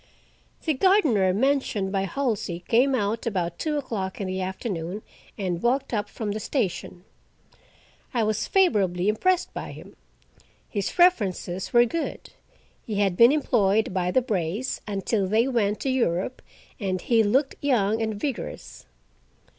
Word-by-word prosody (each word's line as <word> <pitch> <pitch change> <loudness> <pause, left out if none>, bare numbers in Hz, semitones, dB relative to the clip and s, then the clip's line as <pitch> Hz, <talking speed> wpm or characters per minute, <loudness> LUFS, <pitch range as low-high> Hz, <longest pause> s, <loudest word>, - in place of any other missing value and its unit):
The 315 - +2
gardener 275 - +3
mentioned 225 -3 0
by 195 -1 0
Halsey 200 -7 -2
came 260 +4 +3
out 220 0 -1
about 175 -5 -2
two 305 -2 -1
o'clock 210 -9 -4
in 200 - -2
the 185 0 -3
afternoon, 190 0 -4 0.3
and 180 -4 -2
walked 260 +2 0
up 210 -2 -1
from 215 -3 -4
the 215 - -3
station. 195 - -3 1.1
I 235 -4 +1
was 215 0 -1
favorably 200 - +2
impressed 360 +12 +1
by - - -6
him. - - -12 0.7
His 200 - -3
references 195 - +2
were 240 0 +6
good—he 240 -5 -7
had 200 -3 +1
been 235 +6 +7
employed 220 -9 +2
by 180 -2 0
the 255 +7 +2
Brays' 205 +1 -2
until 200 0 -1
they 220 +5 +2
went 215 -5 0
to 270 - -1
Europe, 235 -2 0 0.4
and 190 -3 -1
he 230 +4 +3
looked 260 +7 +2
young 225 -6 +1
and 220 -1 -1
vigorous. 250 +5 -5
215 Hz, 140 wpm, -25 LUFS, 190-260 Hz, 1.1 s, been